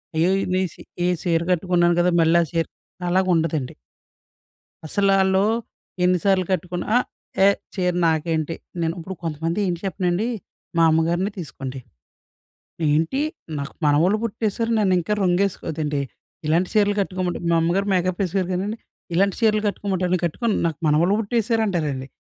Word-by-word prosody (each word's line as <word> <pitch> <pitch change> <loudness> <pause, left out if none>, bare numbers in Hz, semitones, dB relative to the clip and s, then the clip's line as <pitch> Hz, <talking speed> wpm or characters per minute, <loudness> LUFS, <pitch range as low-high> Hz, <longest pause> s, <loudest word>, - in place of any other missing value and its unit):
అయ్యో! 170 +4 +3 0.2
నేను 185 -2 +1
సీ - - -13 0.2
ఏ - - +3
సీర 165 -2 +2
కట్టుకున్నాను 175 -1 +2
కదా! 180 0 +3
మళ్ళీ 165 +1 +4
సీర 165 -1 +1 0.4
అలాగా 185 +1 +2
ఉండదండి. 155 -5 -1 1.1
అసలాల్లూ 195 +1 +3 0.6
ఎన్ని 180 0 +4
సార్లు 190 -2 +3
కట్టుకున్నా 180 -1 -2
అ! - - +7 0.5
ఏ - - +7 0.3
చీర 180 -2 0
నాకేంటి? 160 0 0 0.3
నేను 165 0 0
ఇప్పుడు 190 +3 -6
కొంతమంది 165 +4 -2
ఏంటి 175 -1 -2
చెప్పనాండి, 180 +3 0 0.5
మా 165 - +5
అమ్మగారినే 170 +5 +1
తీసుకోండి. 135 -5 -6 1.1
"ఏంటి? 160 - +1 0.4
నాకు 140 +1 -5
మనవలు 165 +8 +4
పుట్టేసారు, 225 0 -1
నన్ను 195 -3 +3
ఇంకా 210 +5 -1
రంగేసుకో 185 +1 +1
అదేంటి, 150 -2 -2 0.5
ఇలాంటి 170 +4 +2
చీరలు 205 -1 +3
కట్టుకోమంటే." 185 -2 -2
మా 165 - +4
అమ్మగారు 190 +4 +1
మేకప్ 185 +1 0
వేసాకోరు 185 0 -1
కానండి, 200 +5 -2 0.4
"ఇలాంటి 195 +2 +2
చీరలు 215 -2 +3
కట్టుకోమంటావా? 190 -3 -2
నేను 180 - -1
కట్టుకొను 215 +7 -1
నాకు 160 -3 -3
మనవలు 170 +7 +3
పుట్టేసారు" 225 +1 +1
అంటారండి. 145 -8 -2
180 Hz, 140 wpm, -22 LUFS, 165-195 Hz, 1.1 s, అ